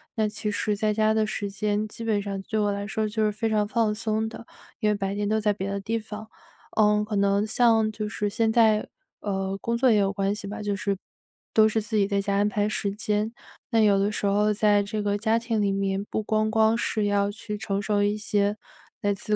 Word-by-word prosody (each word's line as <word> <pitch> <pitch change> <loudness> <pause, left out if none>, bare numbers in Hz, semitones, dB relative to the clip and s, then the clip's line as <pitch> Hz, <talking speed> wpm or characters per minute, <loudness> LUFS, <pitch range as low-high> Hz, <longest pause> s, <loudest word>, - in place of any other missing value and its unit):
那 220 -1 +1
其 210 0 -4
实 210 0 -1
在 215 +1 0
家 215 0 +2
的 220 0 +2
时 205 -2 -3
间 210 +1 -1
基 230 - -8
本 215 -3 +1
上 200 -1 -4
对 220 +1 -2
我 205 -1 +2
来 200 0 -4
说 215 +2 -1
就 215 +1 -1
是 210 - +2
非 225 +2 -2
常 210 -1 +1
放 220 -1 +1
松 220 0 -1
的， 230 0 -10 0.3
因 215 - +2
为 210 - +2
白 195 0 -2
天 205 0 -1
都 220 - +2
在 210 -1 +2
别 195 -1 -4
的 200 0 -2
地 225 +4 -2
方。 215 0 -8 0.5
呃， 210 -1 +4
可 215 0 -4
能 200 +1 +2
像 225 -1 +3
就 215 -1 -4
是 210 -1 -2
现 225 +2 +1
在 220 -2 +4 0.3
呃， 195 -1 -2
工 235 0 -1
作 255 +1 +4
也 215 - +4
有 195 -1 +2
关 195 0 0
系 205 -1 -7
吧， 210 +2 -6
就 205 -1 -1
是 200 -1 -1 0.6
都 220 0 +6
是 220 - 0
自 215 +1 -5
己 200 -1 +3
在 200 -1 0
家 200 0 -1
安 205 +1 +2
排 205 0 0
时 205 -1 -2
间， 210 +1 -1 0.4
那 230 - +3
有 205 -2 +4
的 200 +2 +1
时 205 - -3
候 210 +1 +3
在 205 0 +3
这 210 +1 -3
个 205 0 0
家 220 +1 +2
庭 230 -2 -1
里 200 -1 +2
面， 195 0 -1
不 220 - -2
光 215 0 +1
光 220 0 +4
是 215 -2 -1
要 200 0 +2
去 210 0 -6
承 200 -1 -2
受 205 0 +1
一 205 +1 +1
些 205 0 0 0.4
来 205 0 +1
自 210 +2 -1
210 Hz, 260 characters per minute, -26 LUFS, 200-220 Hz, 0.6 s, 都